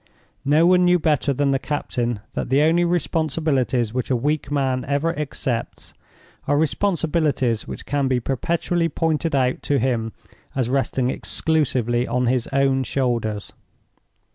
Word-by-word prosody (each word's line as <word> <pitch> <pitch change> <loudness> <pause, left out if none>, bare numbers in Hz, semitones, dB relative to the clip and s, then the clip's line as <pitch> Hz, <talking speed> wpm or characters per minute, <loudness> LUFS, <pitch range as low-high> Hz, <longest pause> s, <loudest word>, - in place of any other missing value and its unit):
No 150 +4 +4
one 180 0 +5
knew 180 0 +5
better 150 -4 +1
than 140 +1 +1
the 135 - +1
captain 120 -6 -2
that - - -3
the 135 +3 +4
only 165 +3 +3
responsibilities 155 -8 0
which 125 0 -2
a 130 - +2
weak 145 +4 -1
man 135 -3 0
ever 145 +4 0
accepts 135 -5 -4 0.5
are 145 - +2
responsibilities 155 - 0
which - - -7
can 140 -1 0
be 130 -1 +1
perpetually 165 +6 -1
pointed 160 0 0
out 130 -1 +1
to 145 - 0
him 115 -3 0 0.4
as 125 -2 0
resting 130 -1 0
exclusively 125 -8 0
on 125 +1 0
his 125 0 +1
own 135 -1 +2
shoulders. 115 -5 -2
135 Hz, 140 wpm, -22 LUFS, 125-155 Hz, 0.5 s, one